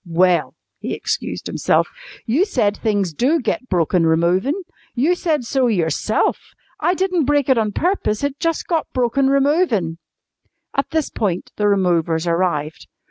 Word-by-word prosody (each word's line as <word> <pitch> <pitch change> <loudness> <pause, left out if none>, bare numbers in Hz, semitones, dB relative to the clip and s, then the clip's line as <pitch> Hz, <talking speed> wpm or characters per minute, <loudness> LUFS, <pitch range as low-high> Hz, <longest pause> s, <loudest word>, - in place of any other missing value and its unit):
"Well," 180 0 +1 0.2
he - - -3
excused - - -3
himself, - - +1 0.4
"you 260 +10 +2
said 230 - 0
things 205 -7 -1
do 275 - +2
get 255 +1 -3
broken 175 -1 +2
removin'. 185 - +1 0.3
You 285 +9 +2
said 315 -6 -1
so 260 +1 +1
yourself! 180 0 0 0.4
I 360 - +1
didn't 365 -4 0
break 285 -1 +1
it 260 - +4
on 215 -2 0
purpose. 320 - -1
It 285 0 -2
jus' 330 -1 0
got 330 -3 -2
broken 255 +2 +1
removin'." 275 - +1 0.7
At 275 - -1
this 315 -2 -1
point 185 -5 -2
the 210 - +1
removers 175 -4 +1
arrived. 170 -3 -1
225 Hz, 145 wpm, -20 LUFS, 180-290 Hz, 0.7 s, it